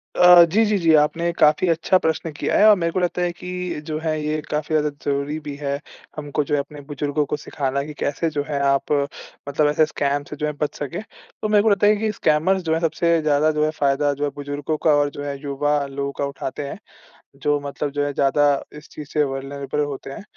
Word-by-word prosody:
अ, 180 -1 +8
जी, 200 +7 +2
जी, 210 -1 +1
जी। 165 -3 +3
आपने 165 +3 0
काफ़ी 150 +4 +4
अच्छा 165 +3 +3
प्रश्न 160 -1 -1
किया 145 - -1
है। 210 - +6
और 210 - +7
मेरे 170 -1 -1
को 185 - -1
लगता 180 0 -1
है 175 0 +1
कि 180 -1 -5
जो 155 -1 -2
है 160 -1 0
ये 155 +1 -1
काफ़ी 150 +1 -2
ज़्यादा 150 -1 +2 0.2
ज़रूरी 140 +2 -1
भी 145 -1 -5
है, 140 -1 -3 0.4
हमको 145 0 -2
जो 145 - -4
है - - +1
अपने 145 +1 -7
बुजुर्गों 145 +1 -1
को 150 - -3
सिखाना 140 -1 -3
कि 150 +1 -8
कैसे 160 +3 -1
जो 145 -2 -2
है 145 -2 -2
आप 140 0 +1 0.6
मतलब 150 +1 +2
ऐसे 155 +1 +3
स्कैम 145 -2 -1
से - - -6
जो 150 - -3
है 150 - 0
बच 150 - -1
सकें। 145 +6 -4
तो 220 0 -9
मेरे 210 -1 +4
को 220 - +4
लगता 205 0 +3
है 210 - +5
कि 215 +1 -1
स्कैमर्स 185 +1 +1
जो 160 -1 0
हैं 160 - +1
सबसे 165 0 +1
ज़्यादा 155 0 +2
जो 150 0 0
है 155 - 0
फ़ायदा 140 0 +2
जो 145 +1 -5
है 145 - +1
बुजुर्गों 145 +2 -3
का 155 -2 +5
और 145 0 +2
जो 145 - -8
है 140 -1 -4
युवा 145 +1 0
लोगों 140 0 -4
का 140 - +1
उठाते 140 0 -5
हैं - - -6 0.6
जो 145 0 +1
मतलब 140 +1 -3
जो 145 0 -1
है 145 - -2
ज़्यादा 145 +1 +3 0.2
इस 150 - -13
चीज़ 150 -2 -9
से 150 - +3
वल्नरेबल 140 +1 -4
होते 140 -2 -7
हैं। 135 - -8
150 Hz, 240 wpm, -22 LUFS, 145-165 Hz, 0.6 s, अ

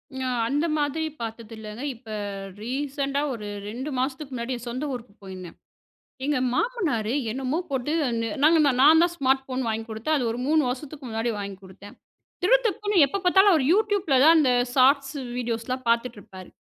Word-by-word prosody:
ங - - -5 0.3
அந்த 290 +6 0
மாதிரி 295 +2 -1 0.2
பார்த்தது 230 0 -6
இல்லைங்க. 215 +3 -8
இப்போ 225 -2 -12 0.5
ரீசண்டா 275 +2 -2
ஒரு 210 -3 -7 0.2
2 255 +7 -5
மாசத்துக்கு 265 +2 -3
முன்னாடி 240 +1 -3
என் 240 0 -9
சொந்த 255 +4 -4
ஊருக்கு 240 -4 -8
போயிருந்தேன். 185 -3 -9 0.7
எங்க 290 -1 +1 0.2
மாமனாரு 295 - 0 0.2
என்னமோ 265 +5 -2
போட்டு 265 +2 -2 0.3
ந 230 - -1 0.2
நாங்க 325 +2 +6 0.2
நான் 315 +4 +7
தான் 345 0 +2
ஸ்மார்ட் 265 -2 +2
ஃபோன் 260 0 -3
வாங்கி 225 0 -2
குடுத்தேன். 225 +8 -1
அது 250 - -1
ஒரு 230 - -4
3 310 +1 +3
வருஷத்துக்கு 275 +3 -6
முன்னாடி 225 +1 -1
வாங்கிக் 200 -1 -7
குடுத்தேன். 190 +2 -13 0.5
திடு 485 +7 +6
திப்புன்னு 410 -4 +2
எப்ப 395 - -3
பார்த்தாலும் 385 +3 +6
அவர் 310 -5 +2
YouTube 410 0 +2
ல - - +6
தான் 330 +1 +7
அந்த 275 -5 +4 0.2
ஷார்ட்ஸ், 275 +2 +4 0.2
வீடியோஸ்லாம் 240 +2 -3
பார்த்துட்டு 235 0 +1
இருப்பாரு. 185 -2 -12
260 Hz, 170 wpm, -25 LUFS, 230-300 Hz, 0.7 s, நான்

